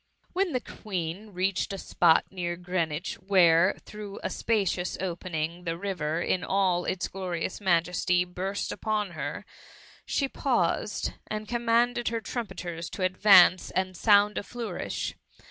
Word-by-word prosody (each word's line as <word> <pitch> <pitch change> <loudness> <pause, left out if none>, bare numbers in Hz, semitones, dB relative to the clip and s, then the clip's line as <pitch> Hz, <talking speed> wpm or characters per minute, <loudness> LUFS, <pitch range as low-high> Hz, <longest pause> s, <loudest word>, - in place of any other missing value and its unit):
When 375 0 +1
the 255 - +1
Queen 190 -1 -5
reached 190 0 -1
a - - -4
spot 170 -3 +3
near 175 -2 -3
Green 175 -1 -1
wich, 150 +3 -4
where, 180 -2 +5
through 210 -2 -8
a - - -2
spacious 195 -5 0
opening, 170 -2 -3
the 165 -1 -2
river, 170 -4 -2
in 180 - 0
all 185 -3 +1
its 185 -2 -1
gloriouB 185 -1 -4
majesty, 180 0 +2
burst 185 +3 -3
upon 210 -3 -1
her, - - -5 0.6
she 275 - 0
paused, 235 -7 0
and 215 0 -4
commanded 240 0 +1
her 230 0 0
trumpeters 180 -8 -5
to 190 - -4
advance 185 -1 +6
and 185 0 -1
sound 205 +1 +4
a - - -6
flourish. 240 +2 -4
185 Hz, 140 wpm, -28 LUFS, 175-210 Hz, 0.6 s, advance